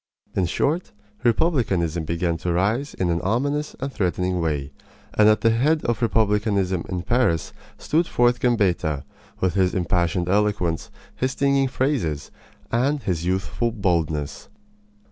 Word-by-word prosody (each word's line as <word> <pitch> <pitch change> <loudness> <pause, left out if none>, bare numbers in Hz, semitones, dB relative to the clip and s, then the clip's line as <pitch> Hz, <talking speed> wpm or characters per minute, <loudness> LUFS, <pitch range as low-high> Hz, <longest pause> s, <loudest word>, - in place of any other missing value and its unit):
In 95 -2 +1
short, 155 - -1 0.3
republicanism 100 - +1
began 85 +1 -1
to 85 +2 -2
rise 105 +11 0
in 90 -2 0
an 85 - 0
ominous 140 +9 -1
and 135 0 -4
threatening 90 -2 0
way; 75 -4 -2 0.4
and 105 0 +5
at 110 - +3
the 115 - +4
head 150 +7 +2
of 120 +1 0
republicanism 105 -5 +1
in 90 -2 -3
Paris 115 -10 +1 0.2
stood 165 +3 +1
forth 120 0 +2
Gambetta, 90 - +1 0.4
with 95 -2 +2
his 95 -2 +2
impassioned 90 0 0
eloquence, 100 -4 0 0.3
his 130 0 -1
stinging 140 0 +2
phrases, 125 - -1 0.4
and 135 +4 +1
his 85 -4 -1
youthful 95 +5 -1
boldness. 85 -8 -1
100 Hz, 135 wpm, -23 LUFS, 85-125 Hz, 0.4 s, and